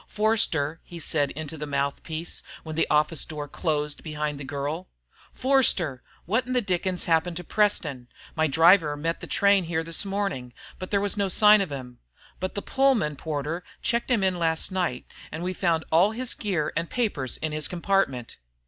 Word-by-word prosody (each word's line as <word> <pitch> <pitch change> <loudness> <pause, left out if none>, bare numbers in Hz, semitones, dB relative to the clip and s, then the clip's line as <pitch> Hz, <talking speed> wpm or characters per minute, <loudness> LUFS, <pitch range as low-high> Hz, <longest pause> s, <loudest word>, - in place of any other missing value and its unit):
"Forster," 170 -8 +1
he 175 - -10
said 145 -2 0
into 155 0 -6
the 150 - -4
mouthpiece 145 +4 -3 0.2
when 155 -1 -6
the 165 - +2
office 150 0 +3
door 150 -2 -5
closed 150 -1 -2
behind 150 -2 -3
the - - -6
girl. 145 +6 -4 0.4
"Forster! 205 - +3 0.2
What 225 +7 0
the 250 - +3
dickens 185 -3 -1
has 165 - +2
happened 165 +1 +1
to 180 - -5
Preston? 155 - 0 0.3
My 160 -1 +2
driver 160 0 +5
met 165 +3 -2
the - - -8
train 200 -2 +3
here 165 -1 -1
this 165 +3 +1
morning, 195 -11 -3 0.3
but 185 - -6
there 200 - +2
was 205 +1 0
no 200 -1 +1
sign 210 +2 +6
of 190 - -3
him. 125 -3 -7 0.4
But 185 0 -3
the 200 - -3
Pullman 265 - +2
porter 155 +3 -4 0.2
checked 235 +2 0
him 230 -6 +2
in 185 -2 +1
last 165 +2 0
night, 175 -9 -1 0.3
and 160 - -5
we 185 +1 -2
found 170 -3 +1
all 180 +7 +4
his 250 +2 -2
gear 180 -8 -2
and 165 +1 -2
papers 200 - -1
in 155 - -3
his 155 0 -1
compartment!" 170 -9 -1
165 Hz, 185 wpm, -26 LUFS, 150-195 Hz, 0.4 s, sign